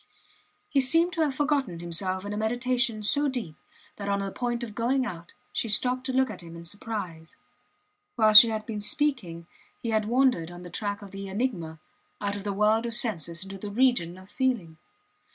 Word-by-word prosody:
He 280 - +1
seemed 330 +7 +4
to 330 - -1
have 290 -4 +1
forgotten 275 - 0
himself 185 +3 +2
in 205 - -4
a - - -4
meditation 240 0 0
so 290 +7 +2
deep 240 - -4 0.4
that 200 -1 -5
on 200 0 +1
the 195 0 -3
point 240 +1 -3
of 220 -3 -6
going 250 +4 0
out 170 -6 -8 0.2
she 230 - -1
stopped 250 +4 +1
to - - -1
look 260 -2 +1
at 210 - -8
him 170 -1 -11
in 170 0 -10
surprise. 180 -4 -6 0.8
While 215 -2 +4
she 225 +2 +11
had 215 -1 -3
been 215 -3 -5
speaking 205 - -1 0.3
he 230 - -3
had 215 -1 +1
wandered 240 -8 +2
on 175 0 -10
the 175 - -10
track 205 -1 -3
of 200 - -11
the 195 0 -7
enigma, 190 -7 -3 0.4
out 205 0 -2
of 200 - -6
the 205 - -2
world 215 +3 +2
of 230 - -4
senses 170 - -1
into 195 0 -9
the 205 - -6
region 205 -6 +1
of 185 0 -14
feeling. 230 -12 -1
215 Hz, 200 wpm, -27 LUFS, 185-250 Hz, 0.8 s, she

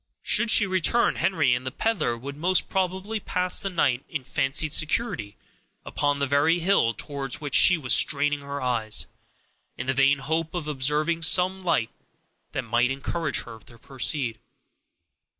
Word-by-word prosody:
Should 235 - +3
she 215 - +5
return, 190 +5 +2
Henry 155 -9 +1
and 125 +1 -3
the 130 - -3
peddler 155 - -2
would 140 +4 -8
most 180 +5 0
probably 190 +3 -2
pass 180 -2 0
the 195 - -3
night 140 -8 0
in 150 -4 -5
fancied 140 +4 -1
security 160 - 0 0.5
upon 145 -1 -1
that 140 - -1
very 145 +5 +2
hill 175 -9 +1
towards 135 -2 -5
which 145 -3 -7
she 180 - +6
was 130 -5 +1
straining 145 0 +2
her 140 0 -6
eyes, 115 -4 0 0.7
in 125 - -5
the 130 - -1
vain 140 +2 +3
hope 160 +5 -3
of 165 -4 -4
observing 150 +4 0
some 180 +3 +3
light 165 -11 -1 0.6
that 135 - -4
might 120 +2 0
encourage 140 +3 -2
her 115 - -11
to 115 +1 -18
proceed. 130 -1 -1
145 Hz, 160 wpm, -24 LUFS, 130-175 Hz, 0.7 s, she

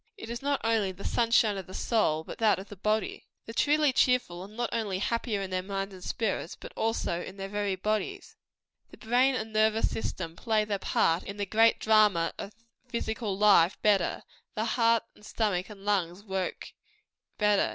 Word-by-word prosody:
It 225 - -8
is 235 - -5
not 280 0 0
only 225 -4 +1
the 185 +2 -11
"sunshine 230 -3 +3
of 190 - -9
the 185 - -9
soul," 160 -9 +1
but - - -9
that 220 -2 +4
of 190 +2 -9
the 205 - -9
body. 215 +3 -1 0.2
The 225 - -8
truly 295 +2 +3
cheerful 250 -10 +2
are 190 - -7
not 230 +3 -4
only 210 -5 -1
happier 215 0 -1
in 190 - -6
their 185 0 0
minds 195 +1 -4
and 185 -1 -11
spirits, 195 -6 -2
but - - -10
also 220 -6 -1
in 190 - -9
their 195 0 -5
very 205 -1 -1
bodies. 215 - -3 0.5
The - - -14
brain 250 +3 +2
and 220 -2 -4
nervous 220 +1 +2
system 170 -6 -4
play 220 +1 +1
their 205 -2 -2
part 165 -1 +2
in 200 - -8
the 205 - -1
great 225 +3 +4
drama 210 -6 +3
of 200 - -6 0.4
physical 220 -4 -3
life 195 -4 +5
better; 200 -4 +2 0.3
the 220 - -1
heart, 230 -1 +2
and - - -21
stomach, 205 -4 -1
and 200 -2 -12
lungs, 190 -2 0
work 190 -3 -4 0.6
better. 210 -1 +3
210 Hz, 190 wpm, -29 LUFS, 190-225 Hz, 0.6 s, life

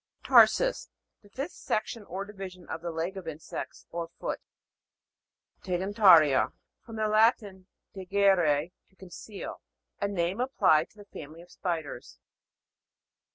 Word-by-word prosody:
TAR'SUS. - - +4 0.3
The 205 - -20
fifth 270 +8 -5
section 215 +1 -3
or 195 +2 -5
divi 195 -2 -7
sion 180 -1 -16
of 160 - -5
the 170 - -4
leg 170 +4 -3
of 185 -3 -8
insects, 155 0 -7
or 170 -1 -4
foot. - - -3 1.2
TEGENA'RIA. 185 -6 +4 0.3
From 225 - -10
the 215 -1 0
Latin, 215 -3 +2 0.3
tegere, 185 -5 +2 0.2
to 190 - -31
conceal. 190 +2 -9 0.4
A 200 - +1
name 190 +2 -1
applied 165 - +3
to - - -28
the 205 - -13
family 160 -3 -11
of 175 - -20
spiders. 160 - -5
190 Hz, 130 wpm, -28 LUFS, 170-205 Hz, 1.2 s, TAR'SUS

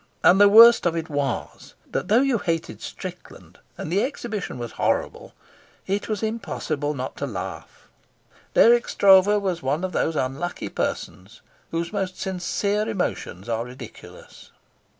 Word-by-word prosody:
And 190 +3 +6
the 205 - +8
worst 230 -1 +8
of 170 - -1
it 165 0 -4
was 140 -4 -4 0.2
that, - - -2
though 230 +7 +4
you 265 -5 +1
hated 165 -3 -3
Strickland, - - -10 0.2
and 155 - -6
the 200 - +3
exhibition 220 - -4
was 120 -1 -6
horrible, - - -2 0.5
it 200 +3 -2
was 215 0 -2
impossible 155 -9 -3
not 130 0 -5
to 140 - -3
laugh. 95 -8 -8 0.7
Dirk 240 +1 +5
Stroeve 200 +1 +5
was 180 -3 -2
one 145 +5 -1
of 185 - -2
those 165 -1 -1
unlucky 140 +6 -3
persons 100 +6 -5 0.3
whose 170 +2 -3
most 190 -3 -3
sincere 200 +3 -1
emotions 150 - -3
are 115 -1 -1
ridiculous. 125 +2 -12
180 Hz, 145 wpm, -23 LUFS, 145-205 Hz, 0.7 s, the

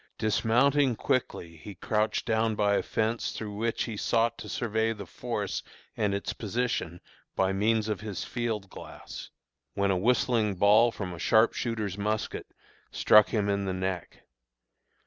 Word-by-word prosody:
Dismounting 125 +5 +2
quickly 85 -10 -2
he 100 +5 -10
crouched 105 +4 0
down 110 -1 +1
by 105 -1 +2
a - - +2
fence 115 +1 -1
through 105 -2 -5
which 115 +2 -1
he 115 - -5
sought 115 +2 +1
to - - -8
survey 110 -1 0
the 100 -2 -8
force - - -4 0.3
and 105 -2 0
its 100 - -3
position 110 -6 -2 0.4
by 95 0 +1
means 110 +2 +1
of 105 -2 -2
his 105 -3 -4
field 115 -5 -3
glass, - - -10 0.5
when 100 0 +2
a - - +2
whistling 110 0 +2
ball 105 +5 +5
from 95 -5 -5
a 85 - -9
sharpshooter's 110 -2 +1
musket 105 +1 -2 0.4
struck 105 -1 +5
him 105 -3 0
in 100 -1 0
the 95 - -1
neck. 95 -2 -4
105 Hz, 150 wpm, -28 LUFS, 100-115 Hz, 0.5 s, ball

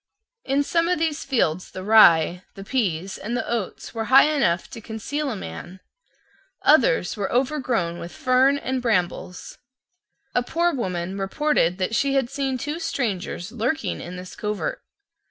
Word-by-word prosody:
In 275 +2 +1
some 335 +3 +1
of 360 - +1
these 320 -1 -1
fields 185 - 0
the 185 - -8
rye, 180 -5 +6
the 195 - -8
pease, 195 -6 -2
and 235 +3 -3
the - - -3
oats 230 -5 -4
were 225 -1 -3
high 270 +5 +6
enough 175 -11 +1
to 230 - -8
conceal 255 +7 -4
a 235 - -3
man. 175 - -8 0.8
Others - - +4
were 200 -3 -3
overgrown 245 - 0
with 170 - -7
fern 260 +2 +3
and 260 -2 -2
brambles. 180 -5 -2 0.7
A 245 - +2
poor 340 +7 0
woman 185 -6 -3
reported 195 - +1
that 190 +3 -2
she 275 +4 +1
had 265 -2 +1
seen 275 -2 -1
two 295 +6 -4
strangers 215 - -3
lurking 245 +7 -2
in 175 +1 -7
this 180 0 -9
covert. 210 -1 -3
230 Hz, 155 wpm, -23 LUFS, 185-275 Hz, 0.8 s, rye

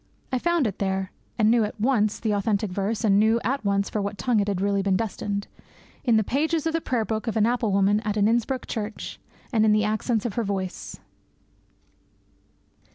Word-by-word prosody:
I 255 - +1
found 345 -1 +1
it 200 -4 -3
there 190 -1 -1 0.3
(and 220 -1 +4
knew 235 -1 +4
at 210 +1 -4
once 215 -3 +2
the 220 - -1
authentic 205 0 0
verse, 205 +4 -2
and 200 -2 +4
knew 220 +2 +4
at 270 +1 -1
once 200 -1 +1
for 210 - -2
what 200 0 -3
tongue 245 -2 +1
it 200 - 0
had 200 -2 0
been 190 - 0
really 200 -1 +1
destined) 200 +1 -1 0.6
in 235 -4 +4
the 220 - +3
pages 310 - 0
of 325 - 0
the 330 - 0
prayer 240 -6 -1
book 220 +2 -3
of 225 - -1
an 215 - +4
apple 235 -2 +1
woman 200 +1 +3
at 215 -1 -2
an 205 0 +4
Innsbruck 240 +3 0
church, 215 -1 -5 0.3
and 220 -2 +4
in 215 -1 +5
the 215 0 +3
accents 215 +1 0
of 230 - -2
her 235 - -1
voice. 190 -3 -4
215 Hz, 210 wpm, -25 LUFS, 200-235 Hz, 0.6 s, in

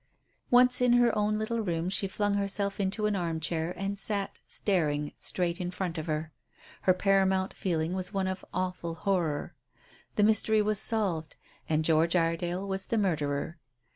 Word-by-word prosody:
Once 250 0 +5
in 245 -1 +5
her 240 -2 +4
own 210 0 +1
little 220 +2 -2
room 170 -4 -1
she 195 +1 +1
flung 205 +1 0
herself 200 0 -1
into 200 +2 0
an 210 -1 +1
arm 170 -3 -2
chair 160 +1 -1
and 195 +1 -3
sat 200 -1 -2
staring 150 -7 0
straight 175 0 -1
in 180 - -2
front 180 -2 -3
of 155 - -6
her. 155 0 -2 0.5
Her 185 - +4
paramount 190 0 +2
feeling 165 -2 -1
was 185 0 -1
one 195 -2 -1
of 185 0 -3
awful 180 -2 -3
horror. 170 -5 -1 0.6
The 210 - +3
mystery 220 0 +3
was 210 -1 +1
solved, 195 -9 0 0.3
and 155 0 +1
George 165 +2 +3
Iredale 175 +3 0
was 190 0 -3
the 230 - 0
murderer. 160 -4 -1
190 Hz, 170 wpm, -29 LUFS, 165-205 Hz, 0.6 s, Once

